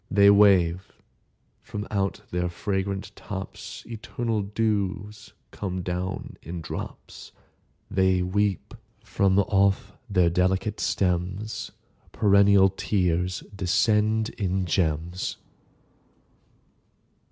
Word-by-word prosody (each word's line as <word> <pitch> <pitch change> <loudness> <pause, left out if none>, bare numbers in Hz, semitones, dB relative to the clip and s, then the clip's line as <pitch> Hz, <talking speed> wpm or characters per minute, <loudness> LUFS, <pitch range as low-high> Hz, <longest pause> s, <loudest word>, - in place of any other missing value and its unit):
They 100 0 +6
wave:—from 100 +1 0
out 100 -2 -1
their 90 0 -1
fragrant 95 +2 -3
tops 95 -2 -7
Eternal 115 -1 -3
dews 105 0 -2 0.2
come 95 -2 -4
down 90 +1 -4
in 85 +3 -6
drops. 80 - -8 0.6
They 95 -1 +2
weep:—from 100 0 -1
off 100 0 +1 0.2
their 90 -4 +3
delicate 95 +4 0
stems 95 +3 -1 0.4
Perennial 100 -2 +5
tears 90 -2 -1
descend 105 +3 +2
in 95 -1 0
gems. 85 0 -1
95 Hz, 80 wpm, -26 LUFS, 90-105 Hz, 0.6 s, They